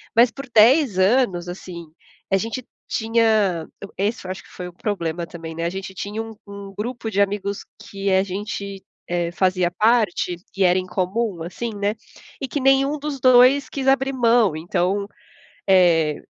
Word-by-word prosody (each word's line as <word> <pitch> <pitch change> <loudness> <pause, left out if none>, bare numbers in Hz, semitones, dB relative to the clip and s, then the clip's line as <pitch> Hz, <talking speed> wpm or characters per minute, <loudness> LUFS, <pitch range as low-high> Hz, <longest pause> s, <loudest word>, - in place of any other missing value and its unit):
mas 235 +1 +6
por 275 0 -9
10 235 - +5
anos, 190 -4 +2
assim 175 -1 -8 0.5
a 195 - +4
gente 230 +5 -4 0.2
tinha 220 -7 +1 0.3
esse 205 +1 -2
eu 185 - -4
acho 190 - -7
que - - -19
foi 180 - -7
o 180 - -11
problema 170 -4 -3
também, 165 -1 -9
né, 165 +1 -3
a - - +1
gente 190 +1 -6
tinha 205 +3 -4
um 225 0 -8
um 200 -1 -9
grupo 230 +1 -4
de 200 0 +2
amigos 200 0 -2 0.2
que 195 0 -3
a 190 0 +4
gente 200 0 -5 0.2
eh, 175 -1 -1
fazia 185 0 +1
parte 210 -3 +2 0.2
e 195 - +3
era 180 0 +4
em 185 - -5
comum 185 0 -2
assim, 225 +7 -5
né, 205 +1 -1 0.5
e 270 - -2
que 290 - -3
nenhum 270 +2 +3
dos 290 -1 -4
2 255 +2 +5
quis 270 -1 -4
abrir 270 0 +3
mão, 235 -7 +3
então 180 +5 -1 0.6
eh 170 -5 +4
200 Hz, 175 wpm, -22 LUFS, 180-235 Hz, 0.6 s, mas